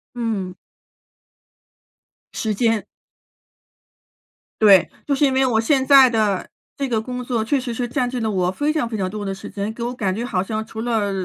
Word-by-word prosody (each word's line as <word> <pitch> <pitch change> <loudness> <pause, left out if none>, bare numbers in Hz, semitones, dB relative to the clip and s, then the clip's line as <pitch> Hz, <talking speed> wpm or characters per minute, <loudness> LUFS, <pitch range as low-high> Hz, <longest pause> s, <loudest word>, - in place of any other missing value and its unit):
嗯。 210 -6 -3 1.8
时 220 -2 -2
间。 225 0 +1 1.8
对， 195 -4 +6 0.2
就 285 - 0
是 290 - +3
因 265 - +2
为 265 0 +3
我 225 -3 +2
现 265 +3 +2
在 270 -2 +8
的 215 -5 0 0.3
这 275 -1 -1
个 225 -3 0
工 250 +1 -5
作 235 -3 -1
确 270 +5 +1
实 245 -2 -4
是 245 +1 -2
占 245 +1 -1
据 250 -1 -3
了 220 -1 -1
我 180 -2 0
非 295 +9 -1
常 305 -7 -1
非 225 -2 -4
常 185 -2 -1
多 210 0 -5
的 195 - -2
时 195 - -9
间。 205 +2 -4
给 235 - -6
我 245 +1 -2
感 195 -6 -2
觉 235 - -3
好 185 -7 -1
像 215 +2 -3
除 220 0 -7
了 220 -4 0
225 Hz, 210 characters per minute, -21 LUFS, 205-250 Hz, 1.8 s, 在